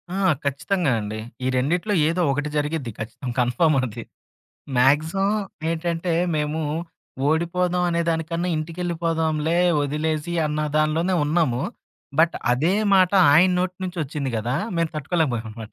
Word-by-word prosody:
ఆ! - - -2 0.3
ఖచ్చితంగా 145 +3 0
అండి. 105 +1 -5 0.3
ఈ - - +2
రెండిట్లో 175 +11 0
ఏదో 175 +2 0
ఒకటి 145 +2 -2
జరిగిద్ది 145 -4 -2
ఖచ్చితం. 120 +4 -6
కన్ఫార్మ్ 125 +6 +2
అది. 115 0 -7 0.7
మాగ్జిమమ్ 160 +11 +3 0.3
ఏంటంటే, 165 +1 -2 0.2
మేము 150 +1 -1 0.7
ఓడిపోదాం 175 +3 +1
అనే 170 0 +1
దానికన్నా 165 +2 -1
ఇంటికెళ్ళిపోదాంలే 165 -1 -1 0.3
ఒదిలేసి 155 +3 -2
అన్న 150 0 -2 0.2
దానిలోనే 160 +4 +1
ఉన్నాము. 150 -5 +1 0.6
బట్ 165 +1 +4 0.2
అదే 155 +10 +2 0.2
మాట 185 0 +4 0.2
ఆయన 180 +5 +6
నోటి 185 0 -1
నుంచొచ్చింది 150 -6 -3
గదా! 120 +5 -1 0.2
మేము 165 -1 0
తట్టుకోలేకపోయామనమాట. 120 -9 -2
160 Hz, 120 wpm, -23 LUFS, 140-170 Hz, 0.7 s, ఆయన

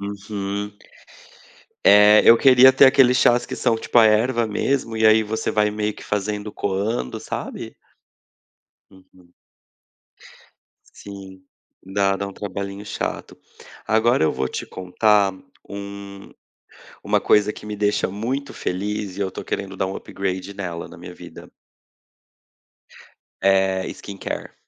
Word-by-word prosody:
Uhum. 100 0 -5 1.1
É, 105 +1 +7
eu 115 - +8
queria 130 0 +7
ter 135 - +7
aqueles 130 -2 +5
chás 120 -1 +3
que - - -6
são 115 -3 +1
tipo 115 - -1
a 115 - +8
erva 115 +2 +2
mesmo 115 +2 -2
e 110 - +2
aí 110 0 +5
você 110 +1 -3
vai 105 -1 +1
meio 105 0 -2
que - - -13
fazendo 105 +1 -3
coando, 100 - -3
sabe? - - -7 1.1
Uhum. 95 -2 -22 1.6
Sim, 95 -2 -11 0.4
dá, 95 0 0
dá 100 - -4
um - - -10
trabalhinho 100 0 -6
chato. - - -5 0.5
Agora 110 -3 +2
eu - - +2
vou 65 - -2
te - - -6
contar 100 +2 +1 0.3
um 100 0 -9 0.7
uma - - +1
coisa 105 0 +3
que - - -12
me 105 0 -5
deixa 105 0 0
muito 125 +8 -4
feliz 100 +1 -4
e 100 - -5
eu 95 - -1
estou - - -8
querendo 95 -1 -5
dar 95 - -1
um 95 - -6
upgrade 95 0 -5
nela, 90 -4 -6
na - - -13
minha 90 +1 -10
vida. - - -12 1.9
Eh, 95 -1 +2
skincare. 100 -1 -7
100 Hz, 135 wpm, -21 LUFS, 95-110 Hz, 1.9 s, eu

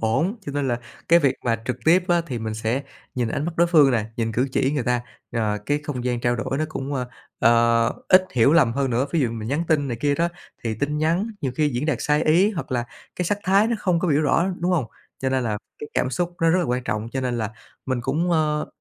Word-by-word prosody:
ổn, 135 - +1
cho 140 - -4
nên 140 -2 -1
là 120 0 -1 0.3
cái 170 +1 +7
việc 140 -5 +2
mà 115 -2 0
trực 125 - -2
tiếp 175 +3 +5
á 175 -1 +3
thì 125 -3 -4
mình 110 -1 -4
sẽ 115 +5 -1 0.3
nhìn 120 -3 0
ánh 140 - -2
mắt 170 - -2
đối 170 - +4
phương 155 -5 +5
nè, 115 -4 +1
nhìn 115 -1 -1
cử 130 +4 +1
chỉ 135 +1 +1
người 140 -4 0
ta, 125 -1 +1 0.3
ờ, 105 -3 0
cái 145 0 +1
không 125 -4 -4
gian 120 -1 -1
trao 120 0 +1
đổi 130 +4 -2
nó 155 - +1
cũng, 140 -2 -4
ờ, 125 -2 -2 0.3
ờ, 115 0 +4 0.2
ít 185 0 +7
hiểu 130 +4 +4
lầm 145 -9 +4
hơn 135 +1 0
nữa. 125 +4 +1
Ví 165 - +2
dụ 120 -4 +1
mình 110 -1 -5
nhắn 155 +5 0
tin 145 -3 +2
này 120 - -2
kia 145 +1 +2
đó 170 +3 +1 0.4
thì 110 -1 -1
tin 145 +6 -2
nhắn 170 +7 +1
nhiều 135 -4 -2
khi 150 -1 +2
diễn 130 +3 -2
đạt 150 -6 +1
sai 150 +1 +2
ý, 175 +7 +4
hoặc 165 -10 -5
là 120 -1 0 0.3
cái 180 - -1
sắc 205 +4 0
thái 195 +3 +4
nó 235 - 0
không 180 -4 +1
có 180 - -1
biểu 145 -1 +3
rõ, 165 +4 +2
đúng 175 - +1
hông? 155 -8 +2 0.3
Cho 130 - -1
nên 130 -1 0
là 105 -2 -1 0.2
cái 150 - -7
cảm 130 - +1
xúc 175 +6 -2
nó 165 - +5
rất 180 - +3
là 180 - +1
quan 125 -2 -1
trọng, 110 +1 -2
cho 130 - -1
nên 125 -2 -1
là 110 -2 -2 0.4
mình 130 -2 -1
cũng, 155 +8 0
ờ, 150 -2 +1
135 Hz, 270 wpm, -23 LUFS, 120-160 Hz, 0.4 s, cái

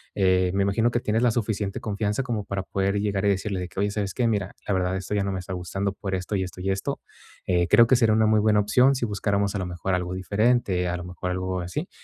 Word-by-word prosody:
eh, 95 -2 +3
me 100 0 +2
imagino 105 +4 +2
que 120 0 -1
tienes 110 +1 0
la 120 -1 +4
suficiente 105 -3 -2
confianza 105 +3 -1
como 115 -6 -3
para 100 -1 -3
poder 100 +1 -1
llegar 100 -1 -1
y - - +4
decirle 100 0 -1
de 90 - -4
que: - - -21
"Oye, 100 +1 +1
¿sabes 100 -2 -2
qué? 125 - 0
Mira, 105 -4 -1
la 100 - 0
verdad, 90 0 0
esto 95 +2 -4
ya 100 - +1
no 100 - -2
me 95 - -3
está 90 +1 -8
gustando 95 +2 -2
por 95 -1 -4
esto, 95 +3 -2
y 95 - 0
esto, 90 0 -8
y 95 - -1
esto. 95 0 -3 0.4
Eh, 90 -1 +2
creo 115 +2 +6
que 130 - +5
sería 115 -3 +3
una 110 0 +3
muy 110 0 +4
buena 105 0 +3
opción 125 +6 +4
si 125 - -1
buscáramos 100 -1 0
a - - 0
lo 95 - -2
mejor 90 +2 -2
algo 90 0 -3
diferente", 100 0 +1
a 90 - -1
lo 90 - -5
mejor 90 0 -5
algo 95 0 -2
así. 90 - -4
100 Hz, 270 wpm, -25 LUFS, 95-110 Hz, 0.4 s, creo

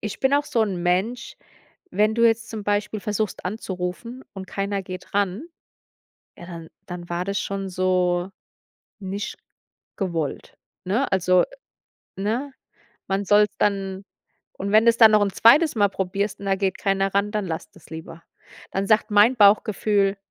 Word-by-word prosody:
Ich 210 -1 -6
bin 265 +1 +3
auch 290 - +2
so 245 -7 +1
'n 185 -5 -2
Mensch 195 +8 -1 0.6
wenn 215 +1 +2
du 235 - +4
jetzt 225 0 0
zum 215 -2 -6
Beispiel 205 +1 -1
versuchst 210 -1 -3
anzurufen 200 +5 -5
und 190 -1 -8
keiner 200 0 -2
geht 185 0 -9
ran, 200 - 0 0.9
ja, - - -11
dann 165 -2 -9 0.2
dann 175 -1 -8
war 175 +1 -2
das 200 0 -2
schon 195 -1 -4
so 180 0 0 0.7
nicht 200 +1 -5 0.6
gewollt, 170 -7 -3 0.3
ne? 220 +9 0
Also, 185 -1 +3 0.7
ne? 235 +8 -2 0.6
Man 195 +1 -1
soll's 210 +1 +4
dann 195 -1 -1 0.5
und 200 +1 -5
wenn 215 +2 +5
du's 230 0 +5
dann 225 -2 +9
noch 210 - +5
'n 200 - +1
zweites 290 +7 +5
Mal 205 -1 +4
probierst 195 +2 -3
und 200 - -7
da 195 - +2
geht 190 -1 -1
keiner 195 0 0
ran, 200 +1 +1
dann 210 -3 -2
lass 160 -1 -5
das - - -19
lieber. 160 +1 -9 0.5
Dann 195 +1 -1
sagt 215 +1 +2
mein 210 +5 +5
Bauchgefühl: 205 -1 +3
200 Hz, 160 wpm, -23 LUFS, 185-215 Hz, 0.9 s, dann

